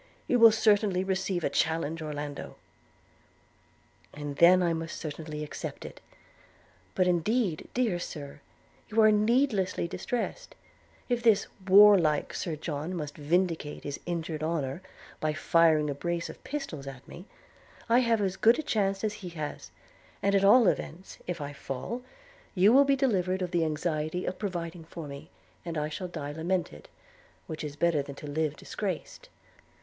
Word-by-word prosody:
'You 250 - +2
will 230 -1 +9
certainly 210 -4 +3
receive 190 -2 -1
a - - +1
challenge, 160 0 0
Orlando.' 145 -2 -5 1.6
'And 145 -1 -6
then 180 +2 +7
I 170 -1 +2
must 165 0 -4
certainly 155 0 -6
accept 150 - -6
it. - - -10 0.9
But 185 - +3
indeed, 180 +1 0
dear 230 -8 +1
Sir, 145 -4 -7 0.5
you 220 - 0
are 215 0 +7
needlessly 210 -4 +2
distressed: 245 - -4 0.5
if 245 -1 0
this 225 -4 +4 0.2
warlike 190 -6 +6
Sir 165 -3 -3
John 155 +3 -4
must 150 -3 -5
vindicate 160 0 -1
his 145 0 -5
injured 165 -2 -3
honour 155 -1 -2 0.4
by 155 0 0
firing 155 -1 +3
a 145 - -1
brace 170 +4 -3
of - - -17
pistols 225 - -5
at 135 -1 -9
me, 180 +5 -11 0.6
I 235 +2 +5
have 230 -3 +2
as 195 -1 -1
good 230 +2 +5
a 315 - -3
chance 195 -8 0
as 215 -1 0
he 180 - -6
has; 155 -3 -6 0.5
and 200 - +2
at 195 0 +3
all 215 +3 +7
events, 180 +2 -3
if 175 -1 -3
I 145 0 -5
fall, 140 - -5 0.5
you 200 +4 +5
will 280 +2 +7
be 275 0 +3
delivered 190 -9 +1
from 180 -1 -2
the 170 -2 +2
anxiety 155 +2 -2
of 185 - -4
providing 175 -4 -4
for 160 -1 -8
me, 140 +3 -9 0.3
and 165 -2 -4
I 150 0 -1
shall 180 +4 -5
die 155 -5 -5
lamented, 170 +4 -3 0.6
which 160 -3 -6
is 145 -1 -5
better 165 -1 +2
than 140 0 -8
to 150 - -10
live 150 0 -1
disgraced. 190 -1 -5
175 Hz, 160 wpm, -29 LUFS, 155-200 Hz, 1.6 s, will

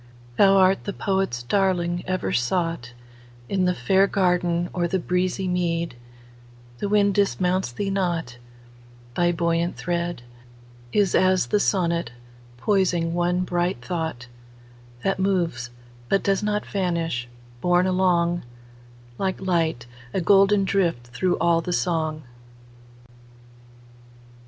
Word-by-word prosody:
Thou 195 +4 +5
art 190 0 +3
the 200 - -3
poet's 190 -14 -1
darling, 175 +2 0
ever 185 - -1
soughtIn 165 - -1 0.8
the 180 - +1
fair 190 +10 +3
garden 180 -3 +1
or 175 -1 0
the 190 - 0
breezy 180 +1 -1
mead; 170 -4 -1 0.8
The 200 - -2
wind 205 -1 +3
dismounts 185 -5 +1
thee 195 +11 -3
not; 170 -10 -2 0.8
thy 175 0 +2
buoyant 170 0 0
threadIs 120 -1 -4
as 185 0 +3
the 210 - +1
sonnet, 170 - 0 0.4
poising 175 - +1
one 175 +1 +1
bright 175 -8 -1
thought, 160 -9 -3 0.8
That 195 -1 0
moves 170 -11 0 0.4
but 195 - +2
does 195 -1 +1
not 210 0 -1
vanish: 170 -10 -2 0.3
borne 180 0 +3
alongLike 175 -2 +2 1.0
light,—a 140 -7 -2
golden 195 +2 +4
drift 170 -12 0
through 175 +9 0
all 170 -1 +2
the 175 +2 -3
song! 160 -3 -1
175 Hz, 110 wpm, -24 LUFS, 165-190 Hz, 1.0 s, Thou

